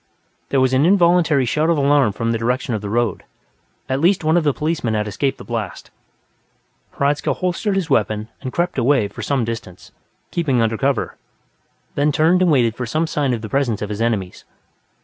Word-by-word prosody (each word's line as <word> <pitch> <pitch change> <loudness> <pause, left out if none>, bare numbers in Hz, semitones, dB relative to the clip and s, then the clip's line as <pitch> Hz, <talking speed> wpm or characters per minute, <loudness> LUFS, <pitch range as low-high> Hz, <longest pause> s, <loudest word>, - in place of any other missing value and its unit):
There 135 - +2
was 130 0 +2
an 130 +2 +3
involuntary 170 -6 +4
shout 155 +7 0
of 170 - +2
alarm 140 -6 +3
from 115 +2 -1
the 115 - -1
direction 125 +2 -1
of 110 - -2
the 105 - -5
road; 120 +1 -1 0.6
at 130 +1 -1
least 175 +3 +2
one 155 +1 +2
of 175 - +3
the 145 - +3
policemen 150 -6 -2
had 105 0 -1
escaped 135 +7 -1
the - - -10
blast. 115 -5 -5 1.0
Hradzka 140 +1 0
holstered 185 +3 -1
his 190 -4 -1
weapon 110 -6 0
and 130 -3 -5
crept 175 -2 -1
away 130 -3 +2
for - - -9
some 135 -5 0
distance, 115 -6 -7 0.4
keeping 145 -8 0
under 115 -1 +1
cover, 135 +1 -1 0.8
then 145 +1 +1
turned 165 +5 +3
and 180 - +4
waited 120 -6 +3
for 125 -1 -4
some 155 +7 0
sign 145 -4 -1
of 115 -2 -3
the - - -4
presence 120 -6 0
of 105 - -4
his 105 +1 -4
enemies. 105 -6 -2
135 Hz, 195 wpm, -20 LUFS, 115-155 Hz, 1.0 s, involuntary